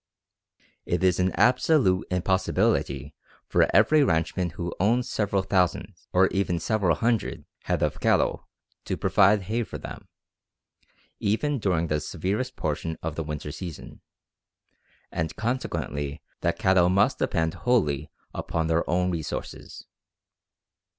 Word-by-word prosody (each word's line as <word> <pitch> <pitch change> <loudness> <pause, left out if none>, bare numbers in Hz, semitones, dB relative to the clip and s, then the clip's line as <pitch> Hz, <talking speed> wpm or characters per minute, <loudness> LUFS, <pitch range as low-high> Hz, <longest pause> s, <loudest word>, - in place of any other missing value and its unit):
It 90 +1 0
is 90 -1 +3
an 90 0 +2
absolute 125 - +3
impossibility 90 -6 0 0.3
for - - +3
every 155 -1 +5
ranchman 85 - 0
who 85 -2 -4
owns 120 +6 +2
several 100 -5 0
thousand, 95 +1 0 0.2
or 95 +1 +5
even 95 -3 0
several 90 0 +1
hundred, 115 -1 -1 0.2
head - - 0
of - - -1
cattle - - +1 0.4
to - - -2
provide 100 +1 +4
hay 110 +5 -1
for 115 - -5
them, - - -9 1.1
even 135 +7 0
during 90 -6 +1
the 75 -2 0
severest 95 +11 -3
portion 80 +1 -3
of 80 -1 -2
the 80 - -3
winter 75 -1 -5
season, 85 0 -8 1.1
and 80 -1 -3
consequently 80 - -3 0.2
the - - +1
cattle 95 -2 +3
must 95 +2 +2
depend 80 -1 0
wholly 85 - 0 0.2
upon 80 -1 -2
their 80 +1 0
own 90 +1 +1
resources. 80 -3 -6
90 Hz, 125 wpm, -26 LUFS, 80-105 Hz, 1.1 s, every